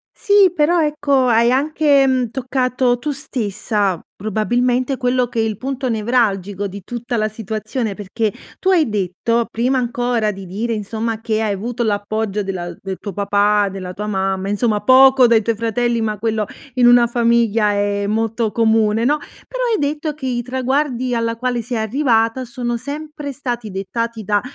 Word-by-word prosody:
Sì 405 -4 +4
però, 335 +2 +3
ecco, 285 -3 +1
hai 235 0 +4
anche, 285 +1 +3
mhmm, 255 -3 +1
toccato 255 -1 0
tu 295 +4 -3
stessa 210 - -2
probabilmente, 245 +5 0
quello 250 -1 +1
che 230 -1 -3
è - - +3
il 220 -2 -1
punto 265 +1 -3
nevralgico 205 -4 0
di 200 0 -9
tutta 240 +2 -4
la 215 -1 +1
situazione, 215 +1 -4
perché 210 +1 -2 0.3
tu 380 - -1
hai 335 -9 +4
detto 210 +4 -1
prima 255 +3 +1
ancora 240 -2 0
di 195 -2 -8
dire, 225 +6 -2
insomma 220 +1 -3
che 220 -1 -1
hai 215 - 0
avuto 235 +5 -3
l'appoggio 210 -1 -1
della 175 -2 -4
del 190 -1 -5
tuo 200 - -6
papà, 205 +1 +2
della 185 -1 -6
tua 210 +1 -5
mamma, 190 -1 -1
insomma 210 +1 +1
poco 260 +2 +6
dai 230 -1 +4
tuoi 225 +1 -1
fratelli, 230 +1 0
ma 215 -2 -2
quello 220 -2 0 0.3
in 250 -2 +4
una 240 -1 +6
famiglia 230 -3 +2
è 205 0 0
molto 225 +1 -1
comune, 220 -1 +2
no. 290 +4 +3 0.3
Però - - -3
hai - - +1
detto 295 +1 -2
che 280 -3 -6
i 240 -1 -1
traguardi 255 0 -1
alla 230 0 0
quale 250 0 -1
sei 235 +1 -3
arrivata 230 +1 +1
sono 240 0 -3
sempre 290 +2 -6
stati 240 -5 -4
dettati 225 +4 -3
da 205 0 +1
230 Hz, 170 wpm, -19 LUFS, 210-255 Hz, 0.3 s, poco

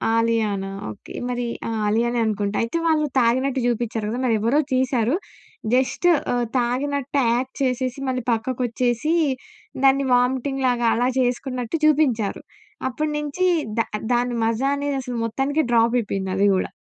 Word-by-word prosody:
'ఆలియానా'? 215 -4 0 0.2
Okay. 105 - -12 0.2
మరి 245 0 -2 0.2
ఆ! - - -2 0.2
'ఆలియానే' 235 +3 +1
అనుకుంటా. 205 -1 -1
అయితే 230 +9 -2
వాళ్ళు 310 -2 +3
తాగినట్టు 260 +3 +2
చూపించారు 230 -2 -1
కదా! 240 +3 -3
మరి 230 -3 +3
ఎవరో 250 +7 +2
తీశారు. 255 0 +1 0.6
జస్ట్ 260 +7 +2 0.3
ఆహ్, 245 -1 +1
తాగినట్టు 280 +3 -1
యాక్ట్ 260 +2 -2
చేసేసి 255 +1 -1
మళ్ళీ 255 -2 -2
పక్కకు 250 +3 -2
వచ్చేసి 245 +6 0 0.7
దాన్ని 270 0 +4
వామిటింగ్ 260 +2 +1
లాగా 240 -1 +1
అలా 245 +2 +1
చేసుకున్నట్టు 250 +2 -1
చూపించారు. 265 -9 +2 0.5
అప్పటి 300 +4 -2
నుంచి 300 +5 -1 0.3
దా 230 - +3 0.3
దాన్ని 245 0 +1
మాజా 230 +5 +1
అనేది 285 0 -2
అసలు 245 -1 -5
మొత్తానికి 275 +7 0
డ్రాప్ 230 0 +3
అయిపోయింది 195 -4 -2
అది 200 +1 +3
కూడా. - - -2
245 Hz, 145 wpm, -22 LUFS, 230-270 Hz, 0.7 s, దాన్ని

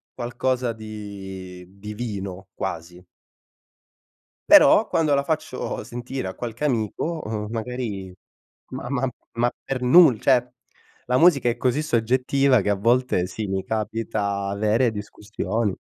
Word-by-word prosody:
qualcosa 120 0 -1
di 95 -4 -8
divino 100 -2 -6
quasi. 85 +2 -5 1.5
Però, - - +7
quando 155 -3 +1
la 140 0 +1
faccio 155 -8 -3
sentire 120 -2 -5
a - - -7
qualche 120 +3 -6
amico, 145 - -1
uhm, 105 -1 -3
magari 110 -6 -4 0.6
ma - - -5
ma 135 -1 0 0.3
ma 120 +1 +2
per 130 -2 -3
nul 130 -2 +6
cioè, 125 -2 +3 0.6
la 125 0 +2
musica 145 -7 +5
è 120 - -2
così 130 +4 +1
soggettiva 130 0 +2
che 105 - -1
a 100 - +3
volte 115 -2 +2
sì, 105 +3 -5
mi 95 0 -2
capita 105 -2 -2
avere 110 +4 +2
discussioni. 105 0 -3
115 Hz, 125 wpm, -23 LUFS, 100-125 Hz, 1.5 s, Però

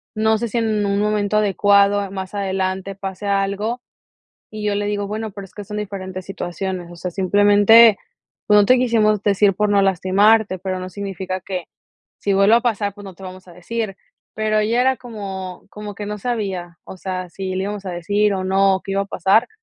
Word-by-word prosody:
no 220 0 +2
sé, 235 - -2
si 240 - -3
en 215 -2 0
un 200 0 0
momento 210 0 +1
adecuado 200 -1 +3
más 190 +1 -6
adelante 190 0 -2
pase 195 0 -6
algo", 200 +4 -1 0.7
y 215 -1 -6
yo 205 - +1
le 205 0 -1
digo: 205 -1 -2
"Bueno, 215 +2 -4
pero 200 0 -8
es 190 - -16
que 205 - -7
son 210 +1 -7
diferentes 190 -3 -6
situaciones, 185 -1 -5
o 175 - -11
sea, 180 +1 -5
simplemente, 205 +3 +6 0.5
pues 210 0 +6
no 205 - +5
te 255 +3 +5
quisimos 215 -4 +2
decir 200 -1 +3
por 210 +2 +1
no 205 -1 +3
lastimarte", 195 +2 +3
pero 185 0 -4
no 185 - -5
significa 190 -1 -5
que 185 -2 -5 0.5
si 200 - 0
vuelve 195 +3 +5
a 235 - +3
pasar, 210 -4 -1
pues, 205 0 -12
no 190 -2 -9
te 190 - -16
vamos 185 0 -10
a - - -13
decir". 195 +3 -4 0.4
Pero 215 0 +1
ya 230 +3 +1
era 260 0 +2
como 195 -6 -7
como 210 -1 -8
que 205 - -6
no 210 0 -4
sabía, 190 -7 -4
o 190 - -10
sea, 185 -1 -5
si 185 +2 -5
le 190 - -1
íbamos 205 0 -5
a - - -3
decir 200 +4 0
o 185 - -3
no, 195 0 +3
o - - -9
qué 195 - -5
iba 195 0 +1
a - - -7
pasar. 195 +4 +2
200 Hz, 210 wpm, -20 LUFS, 190-210 Hz, 0.7 s, simplemente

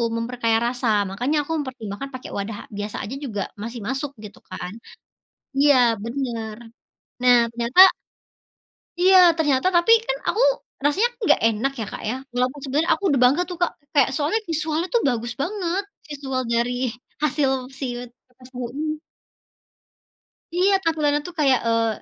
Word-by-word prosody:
memperkaya 230 -1 0
rasa, 245 +1 -1 0.2
makanya 250 +10 -1
aku 290 - -8
mempertimbangkan 255 -3 -6
pakai 255 - -8
wadah 205 +1 -4 0.2
biasa 205 +1 -4
aja 220 +7 -5
juga 215 -7 -3 0.2
masih 235 +1 -6
masuk 270 +2 -3
gitu 210 - -12
kan 180 0 -6 0.9
iya 285 -2 +6 0.3
bener, 230 -3 -4 0.7
nah 250 -1 +6 0.2
ternyata 240 +11 +7 1.1
Iya 375 +1 +7 0.2
ternyata 295 0 +2
tapi 345 +6 +4
kan - - -1
aku 450 - +1 0.4
rasanya 390 +12 +2
enggak 420 - +3
enak 225 +5 -1
ya, 220 - -2
Kak, - - -7
ya, 250 - -1 0.2
walaupun 255 +3 -1
sebenarnya 295 +5 +1
aku - - -5
udah 275 - +2
bangga 270 +7 +4
tuh, 355 - -6
Kak. 350 - +2 0.2
Kaya 280 -4 +5
soalnya 310 +9 0
visual 315 0 -1
tuh 475 - +3
bagus 235 0 -2
banget, 370 +2 -2 0.2
visual 275 -3 -3
dari 235 +1 +1 0.5
hasil 295 -2 +1 0.3
siwet 245 -2 -5 0.2
pepes 250 0 -18
tahu 250 -1 -4
ini. 305 +2 -3 1.6
Iya 380 +3 +3
tampilannya 305 -3 +1
tuh 355 - -10
kayak, 270 -4 +4
eee, 230 0 +2
265 Hz, 145 wpm, -23 LUFS, 235-310 Hz, 1.6 s, ternyata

